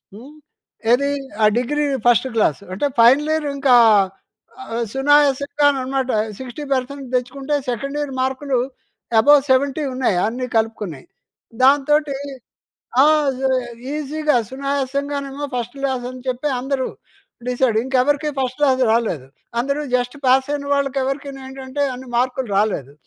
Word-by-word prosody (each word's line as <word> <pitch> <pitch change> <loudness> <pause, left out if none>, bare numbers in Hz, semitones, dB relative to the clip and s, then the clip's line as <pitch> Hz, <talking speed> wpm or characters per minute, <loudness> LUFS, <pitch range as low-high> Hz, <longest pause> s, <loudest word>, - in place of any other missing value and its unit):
హ్మ్. 255 +7 -12 0.6
ఏది? 280 +4 +3 0.3
ఆ - - +7
డిగ్రీ 295 +5 0 0.2
ఫస్ట్ 240 +2 +4
క్లాస్. 210 -9 +2
అంటే, 195 - -1 0.2
ఫైనల్ 270 +6 +5
ఇయర్ 315 -2 -1
ఇంకా 270 -3 +4 1.0
ఆహ్, 235 +1 -1
సునాయాసంగా 285 +1 +3
అన్నమాట. 265 -1 -2 0.3
60% 270 +1 -4
తెచ్చుకుంటే, 270 +3 -2 0.2
సెకండ్ 275 +5 -4
ఇయర్ 290 -2 -3
మార్కులు 265 0 -1 0.6
అబోవ్ 290 +4 +6
70 280 +3 +2
ఉన్నాయి 250 -8 +1
అన్ని 250 +2 -3
కలుపుకుని. 210 -10 -2 0.6
దాంతోటి 285 +1 +3 0.9
ఆ! - - +7 0.9
ఈసీగా 300 -1 0
సునాయాసంగానేమో 280 +1 -3
ఫస్ట్ 245 +1 -4
క్లాస్ 265 -3 -1
అని 255 0 -9
చెప్పి 255 +4 -1
అందరూ 265 0 -2 0.6
డిసైడ్. 250 -3 +1
ఇంకెవరికీ 275 +3 +1
ఫస్ట్ 255 +1 -2
క్లాస్ 265 -3 +3
రాలేదు. 210 - 0 0.3
అందరూ 280 +4 -1 0.2
జస్ట్ 245 +2 -3
పాస్ 260 +1 +4
అయిన 285 -1 -4
వాళ్ళకెవరికీ 275 0 -1 0.2
ఏంటంటే 265 +1 -5
అన్ని 255 0 -10
మార్కులు 255 0 0
రాలేదు. 165 -10 -1
265 Hz, 120 wpm, -20 LUFS, 250-285 Hz, 1.0 s, ఆ